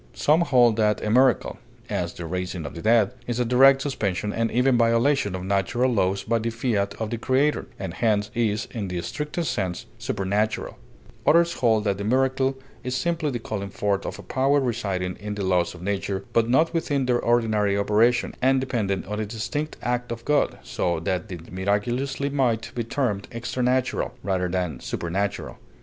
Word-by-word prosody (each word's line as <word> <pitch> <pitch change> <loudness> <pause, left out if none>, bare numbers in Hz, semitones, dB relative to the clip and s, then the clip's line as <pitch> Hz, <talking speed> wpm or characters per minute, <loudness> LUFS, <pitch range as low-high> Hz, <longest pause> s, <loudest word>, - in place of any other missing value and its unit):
Some 155 +3 +3
hold 120 -8 +4
that 105 -1 +2
a 105 - 0
miracle, 125 0 +3 0.3
as 85 -1 -2
the 85 - -7
raising 90 -1 -4
of 70 - -6
the 85 - -7
dead, 110 -1 +4 0.2
is 120 0 -2
a 125 - +2
direct 135 +3 +6
suspension 105 -7 -2
and 115 0 0
even 125 +2 +3
violation 115 -2 +2
of 90 - -5
natural 100 +7 +1
laws 95 -2 +1
by 115 +1 +1
the 115 +1 -1
fiat 115 -4 -1
of 110 -1 -3
the 115 - -3
Creator, 135 +5 +1
and 95 -3 -5
hence 105 -1 +1
is, 110 -2 0
in 110 -5 -4
the 90 -1 -3
strictest 150 - -3
sense, 95 -4 -3
supernatural; 105 -3 -1 0.5
others 170 +1 +5
hold 110 -3 +2
that 100 -2 0
the - - -3
miracle 130 +3 +1 0.3
is 125 0 -2
simply 170 -3 0
the 125 - -2
calling 100 -3 -5
forth 100 0 -1
of - - -5
a - - -10
power 135 +2 +2
residing 100 -8 -2
in 105 0 -5
the 100 -2 -3
laws 90 -2 +1
of 85 - -11
nature, 100 0 -2
but 115 0 +2
not 155 +7 +3
within 145 -5 0
their 125 -1 +2
ordinary 110 -4 +2
operation, 110 +4 +2
and 135 +1 +4
dependent 115 -7 -1
on 105 +2 -4
a 110 - -1
distinct 120 +8 -4
act 125 0 -1
of 115 0 -6
God, 150 -1 +2
so 85 +7 -1
that 90 +6 -2
the 90 - -5
miraculous 105 +8 -1
might 135 -6 0
be 120 - -2
termed 115 -4 -2
"extranatural," 125 +2 -1
rather 95 -1 0
than 90 -7 -2
supernatural. 95 +4 -3
115 Hz, 185 wpm, -24 LUFS, 100-130 Hz, 0.5 s, direct